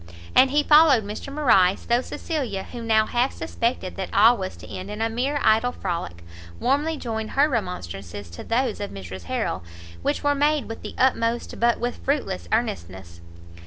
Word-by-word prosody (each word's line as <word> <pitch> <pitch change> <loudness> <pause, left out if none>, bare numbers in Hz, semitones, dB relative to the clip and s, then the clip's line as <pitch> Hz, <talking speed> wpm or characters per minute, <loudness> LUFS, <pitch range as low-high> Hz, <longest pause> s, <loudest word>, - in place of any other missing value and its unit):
And 265 - +6
he 295 +2 +2
followed 300 -6 +6
Mr 210 +7 -6
Morrice, 215 -11 +3
though 240 +1 +2
Cecilia, 255 - -4
who 240 - -8
now 220 -1 +3
half 245 +4 0
suspected 235 -6 -2
that 190 - -4
all 225 +4 +6
was 190 -4 -5
to - - -12
end 185 +2 -7
in 210 +1 -6
a 225 0 0
mere 270 +5 -1
idle 225 +3 +4
frolic, 85 - -5 0.4
warmly 295 +5 +1
joined 220 -4 -4
her 285 +2 +6
remonstrances 100 - -5
to 85 - -8
those 235 0 0
of 205 - -4
Mrs 95 -2 -8
Harrel, 85 - -2 0.4
which - - -1
were 290 0 +3
made 290 -2 +1
with 225 - -7
the - - -8
utmost, 240 -2 +1
but 235 0 +3
with 245 +1 -2
fruitless 260 - -1
earnestness. 85 -1 -3
225 Hz, 175 wpm, -24 LUFS, 185-265 Hz, 0.4 s, And